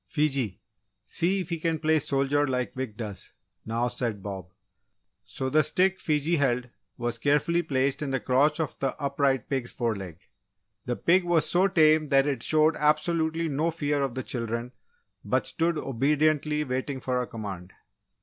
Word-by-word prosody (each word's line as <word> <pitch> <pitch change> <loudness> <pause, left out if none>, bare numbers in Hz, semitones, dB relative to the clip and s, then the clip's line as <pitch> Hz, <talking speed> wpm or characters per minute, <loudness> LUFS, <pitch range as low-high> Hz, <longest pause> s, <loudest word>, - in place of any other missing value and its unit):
"Fiji, 135 - 0 0.4
see 190 +3 0
if 180 - -7
he 170 -1 -2
can 165 0 0
play 155 0 +2
soldier 140 +1 +1
like 125 -5 -2
Wick 130 -5 -5
does?" 105 -4 -7 0.3
now 115 +2 0
said 115 -5 -3
Bob. 95 -3 -6 0.8
So, 130 - -4
the 150 +4 +4
stick 180 +6 +2
Fiji 155 +2 +1
held 125 -3 0 0.3
was 120 -1 -3
carefully 150 +4 +2
placed 135 -3 0
in 145 - -2
the 135 0 0
crotch 140 +5 +2
of 160 -3 -2
the 135 - -2
upright 140 -1 0
pig's 130 -3 -2
foreleg. 100 -8 -3 0.7
The 120 - -1
pig 180 +7 +3
was 175 -2 +2
so 185 +2 +3
tame 155 -4 +4
that 135 0 +4
it 145 -2 -1
showed 155 0 +3
absolutely 160 +2 +1
no 155 +3 0
fear 145 -3 -1
of 135 -3 -2
the 130 - -3
children 115 0 -4 0.5
but - - 0
stood 165 0 0
obediently 150 +3 +1
waiting 130 0 -3
for 125 -1 -1
a 125 - -4
command. 95 -5 -7
140 Hz, 165 wpm, -27 LUFS, 125-155 Hz, 0.8 s, the